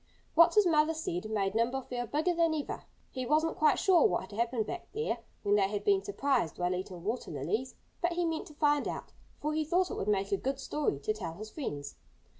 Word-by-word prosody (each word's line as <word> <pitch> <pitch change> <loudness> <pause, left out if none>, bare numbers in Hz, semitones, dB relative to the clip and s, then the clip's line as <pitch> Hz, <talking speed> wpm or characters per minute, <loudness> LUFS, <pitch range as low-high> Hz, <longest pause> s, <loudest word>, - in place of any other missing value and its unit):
What 335 +5 +6
his 420 -2 +6
mother 320 -1 +3
said 215 - -3
made 195 -3 0
Nimble 240 +4 +1
feel 245 -1 -4
bigger 315 +7 +1
than 330 -2 +2
ever. 295 - -4 0.3
He 255 - -3
wasn't 315 +3 +2
quite 305 -1 +5
sure 370 -4 +5
what 175 - 0
had 190 - -11
happened 235 -1 +1
back 360 - -6
there, 445 +2 -1 0.2
where 205 - +2
they 195 -2 +4
had 205 0 -3
been 395 -1 +3
surprised 280 - 0
while 180 0 0
eating 180 -1 -5
water 225 +6 -2
lilies. 180 - -2 0.3
But 345 0 +1
he 350 0 0
meant 325 -1 -2
to 300 - -14
find 295 -1 +2
out, - - -5 0.3
for 300 +1 -1
he 310 0 +1
thought 355 +4 +1
it - - -4
would 195 - -3
make 200 -1 +1
a 200 - +3
good 270 +4 -2
story 290 - -1
to 215 - 0
tell 180 -7 -5
his 215 +4 -8
friends. 145 - -5
265 Hz, 230 wpm, -31 LUFS, 200-320 Hz, 0.3 s, What